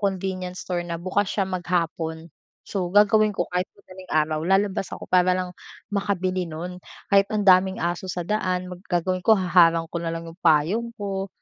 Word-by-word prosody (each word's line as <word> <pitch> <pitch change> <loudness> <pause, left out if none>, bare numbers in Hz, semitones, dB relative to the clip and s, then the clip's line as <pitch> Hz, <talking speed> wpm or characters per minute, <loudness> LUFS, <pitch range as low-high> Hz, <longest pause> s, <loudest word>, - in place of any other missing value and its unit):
convenience 185 -2 -3
store 180 -1 -1
na 170 -1 -3
bukas 190 +2 0
siya 195 - 0
maghapon. 170 -3 -2 0.4
So 185 -3 -2
gagawin 210 +1 +5
ko 175 - +1
kahit 180 +1 -1
madaling 185 -2 -14
araw 155 0 +1
lalabas 195 0 +1
ako - - -6
para 185 0 +4
lang 185 -1 -3 0.4
makabili 185 -3 -1
no'n 175 +3 -6 0.3
kahit 195 0 +6
ang 210 -1 0
daming 190 +1 +5
aso 175 +2 -2
sa 180 -1 -3
daan 185 -3 -1 0.2
gagawin 185 +1 0
ko 220 - +6
haharang 175 -3 +4
ko 170 - -1
na 170 - -3
lang 165 0 -6
yung 165 +3 -12
payong 170 +9 +2
ko 195 -1 -3
185 Hz, 175 wpm, -24 LUFS, 175-195 Hz, 0.4 s, kahit